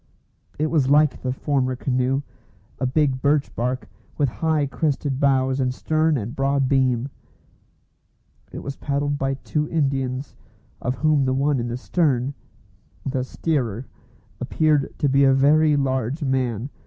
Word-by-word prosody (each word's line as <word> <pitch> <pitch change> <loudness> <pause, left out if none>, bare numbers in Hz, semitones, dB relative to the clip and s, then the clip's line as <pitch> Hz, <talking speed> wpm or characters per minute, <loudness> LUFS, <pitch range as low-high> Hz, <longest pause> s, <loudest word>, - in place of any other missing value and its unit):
It 155 +1 0
was 145 -5 +2
like 150 0 +4
the 130 - -1
former 130 -1 0
canoe, 130 +2 0 0.6
a 130 - 0
big 130 -1 +1
birch 145 0 +1
bark, 125 +2 -2 0.3
with 145 -3 +2
high 155 +3 0
crested 140 -1 -1
bows 135 -1 +2
and 130 -1 +1
stern 155 +3 +1
and 115 +1 -5
broad 135 0 +1
beam. 130 -1 +1 1.4
It - - -7
was 140 - -5
paddled 145 0 -1
by 135 0 0
two 150 +2 -2
Indians, 135 -3 -1 0.5
of 125 +2 -1
whom 155 -2 +2
the 130 0 +1
one 140 0 +1
in 120 - -2
the 120 +1 -3
stern 135 -2 0 0.7
the 135 -2 -1
steerer 130 -5 -2 0.5
appeared 150 -3 +1
to 145 - +1
be 140 +1 +4
a 135 -1 +5
very 150 +3 +4
large 135 +1 -1
man. 130 -2 -1
135 Hz, 145 wpm, -23 LUFS, 130-145 Hz, 1.4 s, a